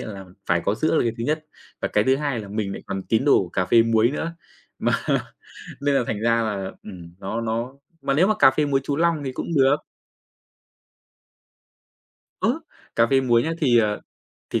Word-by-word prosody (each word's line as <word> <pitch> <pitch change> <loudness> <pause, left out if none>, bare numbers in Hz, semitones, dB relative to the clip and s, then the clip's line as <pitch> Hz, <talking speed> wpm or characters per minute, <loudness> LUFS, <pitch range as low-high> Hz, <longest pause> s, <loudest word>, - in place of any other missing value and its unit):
á 110 - -6
là 95 -1 -9 0.2
phải 85 -1 +2
có 100 - +1
sữa 155 +8 0
là - - +3
cái 115 -2 0
thứ 115 - -2
nhất 155 +2 -1 0.4
và - - 0
cái 105 0 +2
thứ 130 0 +3
hai 140 -5 -2
là 100 - -9
mình 105 -1 -3
lại - - -7
còn 95 -1 -4
tín 115 +4 +2
đồ 145 - +5
của 90 - -7
cà 90 +1 -1
phê 115 +4 +5
muối 115 +1 +3
nữa, 165 +3 -4 0.4
mà - - +1 0.9
nên 140 -1 +2
là 125 - +3
thành 105 - -2
ra 115 0 +2
là, 100 -3 -3
ừm, 90 -4 -11
nó 110 +5 -3
nó 115 +3 -2 0.3
mà 135 - 0
nếu 175 +7 +4
mà 215 - +3
cà 135 - +7
phê 150 +2 +1
muối 135 -1 +2
chú 140 0 -2
Long 165 -3 +1
thì 130 - -3
cũng 165 - -5
được. 135 -1 +5 2.7
Ơ, - - +1 0.4
cà 115 0 +5
phê 135 +2 +3
muối 120 -2 +3
nhá, 165 - -1
thì, 130 -7 +4
ờ, 105 -2 +1 0.5
thì - - 0
115 Hz, 215 wpm, -23 LUFS, 105-140 Hz, 2.7 s, cà